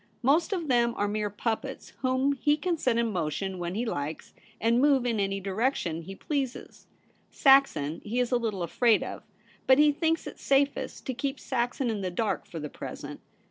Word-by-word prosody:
Most 310 Hz, -, +3 dB
of 350 Hz, -5 st, -2 dB
them 235 Hz, -2 st, +2 dB
are 205 Hz, -, +1 dB
mere 210 Hz, 0 st, -1 dB
pup 220 Hz, +2 st, -1 dB
pets, 270 Hz, -1 st, -9 dB
whom 260 Hz, +1 st, +1 dB
he 295 Hz, +2 st, +2 dB
can 350 Hz, +2 st, 0 dB
set 255 Hz, -7 st, +1 dB
in 235 Hz, -1 st, +1 dB
motion 180 Hz, +3 st, -2 dB
when 175 Hz, +1 st, -3 dB
he 235 Hz, +3 st, -1 dB
likes, 150 Hz, -7 st, -4 dB, 0.3 s
and 235 Hz, +2 st, +3 dB
move 275 Hz, -3 st, +4 dB
in 230 Hz, -3 st, 0 dB
any 195 Hz, 0 st, 0 dB
direction 195 Hz, -, -1 dB
he 195 Hz, +4 st, -9 dB
pleases. 270 Hz, +1 st, -4 dB, 0.4 s
Saxon 270 Hz, -, +4 dB
he 230 Hz, +4 st, -2 dB
is 245 Hz, 0 st, 0 dB
a 245 Hz, -, +4 dB
little 215 Hz, -6 st, -2 dB
afraid 225 Hz, +5 st, +3 dB
of; -, -, -6 dB, 0.5 s
but 260 Hz, -, +7 dB
he 300 Hz, 0 st, +6 dB
thinks 325 Hz, +2 st, 0 dB
it -, -, -8 dB
safest 280 Hz, +1 st, 0 dB
to 260 Hz, -, -2 dB
keep 270 Hz, +2 st, -3 dB
Saxon 245 Hz, 0 st, -1 dB
in 210 Hz, -2 st, -3 dB
the 185 Hz, -, -1 dB
dark 210 Hz, +5 st, -2 dB
for 165 Hz, -, -7 dB
the 150 Hz, -, -4 dB
present. -, -, -8 dB
235 Hz, 195 wpm, -28 LUFS, 195-275 Hz, 0.5 s, but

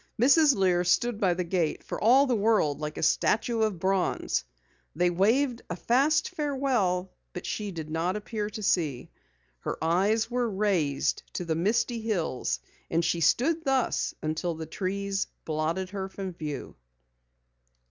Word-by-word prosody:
Mrs. 285 Hz, +3 st, +6 dB
Lear 180 Hz, -3 st, +2 dB
stood 210 Hz, +5 st, +1 dB
by 185 Hz, -5 st, +2 dB
the 180 Hz, -, -1 dB
gate 170 Hz, -2 st, -1 dB
for -, -, -6 dB
all 260 Hz, +5 st, +6 dB
the 255 Hz, -3 st, +1 dB
world 205 Hz, -10 st, +2 dB
like 150 Hz, 0 st, -5 dB
a -, -, -3 dB
statue 225 Hz, +7 st, +2 dB
of 215 Hz, -4 st, +1 dB
bronze. 190 Hz, +1 st, 0 dB, 0.5 s
They 175 Hz, +2 st, +2 dB
waved 235 Hz, +8 st, +2 dB
a 175 Hz, -, -2 dB
fast 270 Hz, -, +2 dB
farewell 255 Hz, -, 0 dB, 0.2 s
but 180 Hz, -, -6 dB
she 210 Hz, -1 st, -3 dB
did 165 Hz, -5 st, -6 dB
not 170 Hz, +4 st, 0 dB
appear 210 Hz, 0 st, -3 dB
to 215 Hz, 0 st, -7 dB
see. 155 Hz, -10 st, 0 dB, 0.5 s
Her -, -, -4 dB
eyes 195 Hz, +8 st, +2 dB
were 240 Hz, 0 st, -1 dB
raised 190 Hz, -9 st, 0 dB
to 180 Hz, -, -3 dB
the 165 Hz, -, 0 dB
misty 225 Hz, +7 st, 0 dB
hills 160 Hz, -, -1 dB, 0.3 s
and 165 Hz, 0 st, +1 dB
she 170 Hz, +1 st, 0 dB
stood 320 Hz, -, +2 dB
thus 270 Hz, -4 st, 0 dB
until 160 Hz, +2 st, -2 dB
the 160 Hz, 0 st, -6 dB
trees 195 Hz, +4 st, -2 dB, 0.2 s
blotted 165 Hz, +4 st, -2 dB
her 195 Hz, -1 st, -4 dB
from 190 Hz, -1 st, -6 dB
view. 150 Hz, -4 st, -6 dB
190 Hz, 155 wpm, -28 LUFS, 170-230 Hz, 0.5 s, Mrs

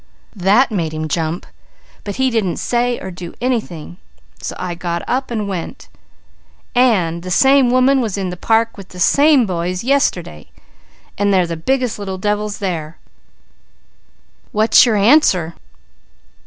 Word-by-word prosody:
"That 205 Hz, +7 st, +3 dB
made 165 Hz, -6 st, -2 dB
him 155 Hz, 0 st, -3 dB
jump, 160 Hz, +2 st, -2 dB, 0.6 s
but 205 Hz, -, -5 dB
he 265 Hz, -1 st, +1 dB
didn't 210 Hz, -7 st, 0 dB
say 245 Hz, 0 st, -1 dB
or 190 Hz, -, -7 dB
do 175 Hz, -1 st, -9 dB
anything, 215 Hz, -10 st, -3 dB, 0.4 s
so -, -, -5 dB
I 180 Hz, -1 st, -4 dB
got 170 Hz, 0 st, -4 dB
up 260 Hz, +1 st, -1 dB
and 215 Hz, -4 st, -3 dB
went 185 Hz, -4 st, -6 dB, 0.8 s
and 195 Hz, -10 st, +2 dB
the 185 Hz, -, -7 dB
same 265 Hz, +6 st, +4 dB
woman 255 Hz, +2 st, +3 dB
was 215 Hz, -5 st, -3 dB
in 190 Hz, -2 st, -3 dB
the -, -, -5 dB
park 225 Hz, +5 st, 0 dB
with 195 Hz, -2 st, -11 dB
the 180 Hz, -, -11 dB
same 280 Hz, -, +4 dB
boys 180 Hz, 0 st, -3 dB
yesterday, 185 Hz, -, -1 dB, 0.7 s
and 205 Hz, 0 st, +2 dB
they're 185 Hz, -2 st, +3 dB
the 170 Hz, -1 st, -4 dB
biggest 250 Hz, +6 st, -1 dB
little 190 Hz, -2 st, -5 dB
devils 210 Hz, +1 st, -2 dB
there. 165 Hz, -5 st, -4 dB, 1.5 s
What's 215 Hz, +2 st, +5 dB
the 235 Hz, -, +1 dB
answer?" 195 Hz, -, +3 dB
200 Hz, 145 wpm, -17 LUFS, 175-245 Hz, 1.5 s, What's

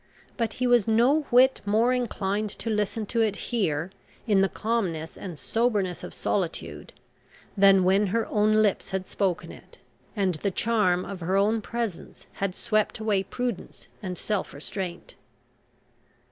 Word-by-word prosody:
But 230 Hz, -2 st, -1 dB
he 255 Hz, -, -2 dB
was 245 Hz, -4 st, +4 dB
no 255 Hz, +7 st, +3 dB
whit 260 Hz, +2 st, +5 dB
more 220 Hz, +5 st, +2 dB
inclined 210 Hz, -4 st, -1 dB
to 225 Hz, +3 st, -4 dB
listen 210 Hz, +1 st, -1 dB
to 230 Hz, +2 st, 0 dB
it 215 Hz, -3 st, +1 dB
here, 185 Hz, -8 st, -1 dB, 0.3 s
in 205 Hz, -5 st, +3 dB
the 195 Hz, -, +3 dB
calmness 185 Hz, -9 st, -2 dB
and 180 Hz, -5 st, -7 dB
soberness 210 Hz, -3 st, 0 dB
of -, -, -7 dB
solitude, 180 Hz, -5 st, -3 dB, 0.6 s
than 195 Hz, -2 st, +6 dB
when 195 Hz, +3 st, +3 dB
her 225 Hz, +4 st, 0 dB
own 215 Hz, 0 st, +2 dB
lips 205 Hz, -3 st, 0 dB
had 190 Hz, -1 st, -3 dB
spoken 185 Hz, -3 st, -2 dB
it, -, -, -15 dB, 0.4 s
and 195 Hz, -3 st, +1 dB
the 200 Hz, -, +1 dB
charm 190 Hz, -3 st, +1 dB
of 195 Hz, -2 st, -6 dB
her 185 Hz, +3 st, 0 dB
own 215 Hz, +3 st, +2 dB
presence 230 Hz, -4 st, -5 dB, 0.2 s
had 195 Hz, -2 st, -1 dB
swept 215 Hz, -2 st, 0 dB
away 215 Hz, -3 st, +1 dB
prudence 240 Hz, +1 st, -5 dB
and 185 Hz, -3 st, -5 dB
self 210 Hz, -8 st, -2 dB
restraint. 175 Hz, +4 st, -6 dB
205 Hz, 150 wpm, -26 LUFS, 190-230 Hz, 0.6 s, than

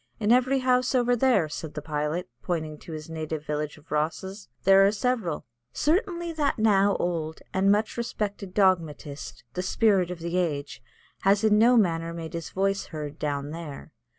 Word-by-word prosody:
"In 215 Hz, 0 st, +2 dB
every 255 Hz, +2 st, +4 dB
house 255 Hz, 0 st, +2 dB
over 245 Hz, -1 st, +3 dB
there," 240 Hz, -9 st, +3 dB
said 155 Hz, 0 st, -7 dB
the 150 Hz, -, -4 dB
pilot, 150 Hz, +3 st, -2 dB
pointing 155 Hz, -2 st, -3 dB
to 170 Hz, -, -11 dB
his 155 Hz, -1 st, -6 dB
native 155 Hz, -1 st, -5 dB
village 150 Hz, 0 st, -3 dB
of 150 Hz, +1 st, -21 dB
Rosses, 190 Hz, +7 st, -2 dB
"there 195 Hz, 0 st, +7 dB
are 200 Hz, -, +5 dB
several." 215 Hz, -7 st, -1 dB, 0.3 s
Certainly 345 Hz, 0 st, 0 dB
that 295 Hz, -3 st, 0 dB
now 205 Hz, -2 st, +4 dB
old 160 Hz, -2 st, -2 dB
and 195 Hz, +1 st, +3 dB
much 215 Hz, +3 st, +1 dB
respected 205 Hz, -4 st, -4 dB
dogmatist, 165 Hz, -7 st, 0 dB
the 180 Hz, -, -2 dB
Spirit 190 Hz, -1 st, +2 dB
of 180 Hz, -, -5 dB
the 170 Hz, +2 st, -3 dB
Age, 150 Hz, -5 st, -2 dB, 0.4 s
has 200 Hz, +2 st, +3 dB
in 210 Hz, -1 st, +5 dB
no 240 Hz, +2 st, +6 dB
manner 165 Hz, -5 st, +1 dB
made 165 Hz, 0 st, -6 dB
his 165 Hz, -1 st, -5 dB
voice 195 Hz, +1 st, 0 dB
heard 150 Hz, -2 st, -7 dB
down 145 Hz, -1 st, -2 dB
there. 160 Hz, -3 st, -8 dB
180 Hz, 175 wpm, -26 LUFS, 155-215 Hz, 0.4 s, there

